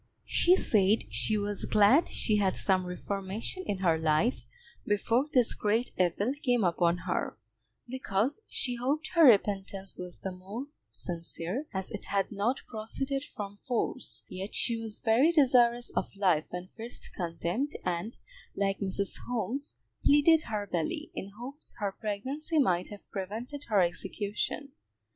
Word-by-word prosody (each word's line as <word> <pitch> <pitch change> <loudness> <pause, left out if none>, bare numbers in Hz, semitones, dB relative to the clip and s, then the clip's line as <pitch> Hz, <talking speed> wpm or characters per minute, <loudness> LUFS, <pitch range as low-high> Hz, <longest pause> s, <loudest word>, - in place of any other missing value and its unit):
She 355 +1 +4
said 210 - +3
she 215 - +1
was 205 -1 -2
glad 215 +10 +5
she 215 -2 +1
had 195 -2 +2
some 185 -2 +1
reformation 195 - -4
in 200 - 0
her 165 -2 +4
life 160 - +1 0.4
before 230 +6 +1
this 250 -4 +4
great 220 +4 +1
evil 190 +7 +1
came 245 -4 +2
upon 175 0 +2
her, - - -1 0.5
because 255 - -1
she 245 -1 -1
hoped 280 +6 -1
her 335 - +4
repentance 195 -4 +3
was 180 -1 -5
the 190 - -5
more 195 +8 -7 0.3
sincere 175 - -3
as 190 -2 -4
it 205 - -4
had 195 -1 0
not 215 +6 0
proceeded 270 +5 -2
from 205 -6 -7
force; 250 +3 -2
yet 190 +3 -6
she 235 - 0
was 225 -2 -4
very 235 +7 +4
desirous 245 -6 +4
of - - -2
life 180 -6 +2
when 180 0 -5
first 225 +5 -6
condemned, 175 - -2
and, 180 +6 -2 0.4
like 195 -1 0
Mrs. 195 0 -1
Holmes, 250 +4 -2 0.3
pleaded 310 +2 +5
her 210 -2 -2
belly, 170 -4 -2
in 195 - -5
hopes 270 +6 -7
her 205 -3 -1
pregnancy 260 - -3
might 180 - +3
have 205 -1 -11
prevented 225 +9 -5
her 210 -4 +3
execution. 200 - -2
210 Hz, 145 wpm, -30 LUFS, 190-250 Hz, 0.5 s, glad